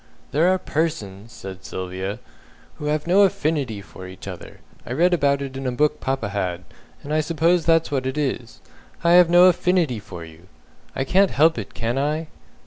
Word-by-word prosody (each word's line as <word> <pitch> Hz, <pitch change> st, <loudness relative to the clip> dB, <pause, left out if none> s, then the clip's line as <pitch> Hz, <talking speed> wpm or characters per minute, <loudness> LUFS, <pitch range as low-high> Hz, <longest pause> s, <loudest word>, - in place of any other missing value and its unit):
"There 165 Hz, +5 st, +3 dB
are 185 Hz, -, +2 dB
persons," 115 Hz, -, -3 dB
says 95 Hz, -4 st, -8 dB
Sylvia, 95 Hz, +2 st, -5 dB, 0.6 s
"who 150 Hz, -, -7 dB
have 150 Hz, 0 st, -1 dB
no 185 Hz, +4 st, +4 dB
Affinity 150 Hz, -, 0 dB
for 95 Hz, -2 st, -11 dB
each 95 Hz, 0 st, -11 dB
other. -, -, -9 dB, 0.2 s
I 120 Hz, -, -5 dB
read 175 Hz, +6 st, +3 dB
about 140 Hz, -4 st, +2 dB
it 135 Hz, -1 st, -7 dB
in 135 Hz, 0 st, -4 dB
a -, -, 0 dB
book 150 Hz, +4 st, +1 dB
papa 130 Hz, -5 st, -2 dB
had, 90 Hz, -4 st, -3 dB, 0.4 s
and 150 Hz, -, -4 dB
I 155 Hz, -, +3 dB
suppose 165 Hz, +2 st, +1 dB
that's 165 Hz, -1 st, +3 dB
what 130 Hz, -2 st, -1 dB
it 130 Hz, +3 st, -3 dB
is. 130 Hz, -5 st, -3 dB, 0.4 s
I 170 Hz, -, +4 dB
have 175 Hz, -1 st, +7 dB
no 175 Hz, +1 st, +7 dB
Affinity 180 Hz, -, +2 dB
for 90 Hz, -5 st, -9 dB
you. 80 Hz, +2 st, -16 dB, 0.5 s
I 135 Hz, -, 0 dB
can't 190 Hz, +8 st, +3 dB
help 155 Hz, -2 st, +3 dB
it, 105 Hz, -, -8 dB
can 120 Hz, +3 st, -1 dB
I?" 155 Hz, +3 st, -1 dB
140 Hz, 190 wpm, -22 LUFS, 105-165 Hz, 0.6 s, have